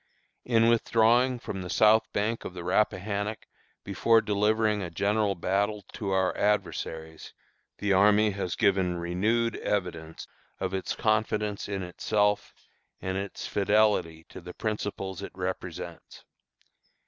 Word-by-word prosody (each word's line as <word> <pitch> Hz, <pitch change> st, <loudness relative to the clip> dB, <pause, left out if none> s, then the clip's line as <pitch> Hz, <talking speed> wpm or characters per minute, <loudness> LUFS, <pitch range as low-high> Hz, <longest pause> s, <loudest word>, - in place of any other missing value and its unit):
"In 115 Hz, -2 st, +3 dB
withdrawing 115 Hz, +2 st, +3 dB
from 95 Hz, -5 st, -6 dB
the 90 Hz, -, -6 dB
south 110 Hz, +3 st, +4 dB
bank 110 Hz, +3 st, -1 dB
of 90 Hz, -, -7 dB
the 90 Hz, -, -6 dB
Rappahannock 105 Hz, +2 st, -1 dB, 0.4 s
before 115 Hz, -1 st, +3 dB
delivering 105 Hz, 0 st, +1 dB
a 90 Hz, -, -4 dB
general 100 Hz, +3 st, 0 dB
battle 100 Hz, +4 st, -1 dB
to 100 Hz, -, -4 dB
our 95 Hz, -1 st, +1 dB
adversaries, 80 Hz, -5 st, -2 dB, 0.4 s
the 100 Hz, -1 st, +1 dB
army 105 Hz, +2 st, +5 dB
has 95 Hz, -3 st, -3 dB
given 95 Hz, -3 st, +2 dB
renewed 105 Hz, +7 st, 0 dB
evidence 85 Hz, -5 st, -3 dB, 0.3 s
of 95 Hz, 0 st, -3 dB
its 95 Hz, -1 st, -2 dB
confidence 105 Hz, -2 st, 0 dB
in 100 Hz, -2 st, -3 dB
itself 105 Hz, +3 st, 0 dB, 0.5 s
and 95 Hz, 0 st, -3 dB
its 100 Hz, +1 st, -5 dB
fidelity 100 Hz, -6 st, +1 dB
to -, -, -10 dB
the 90 Hz, -, -10 dB
principles 100 Hz, -3 st, -4 dB
it -, -, -7 dB
represents. 90 Hz, -2 st, -6 dB
100 Hz, 125 wpm, -28 LUFS, 90-110 Hz, 0.5 s, army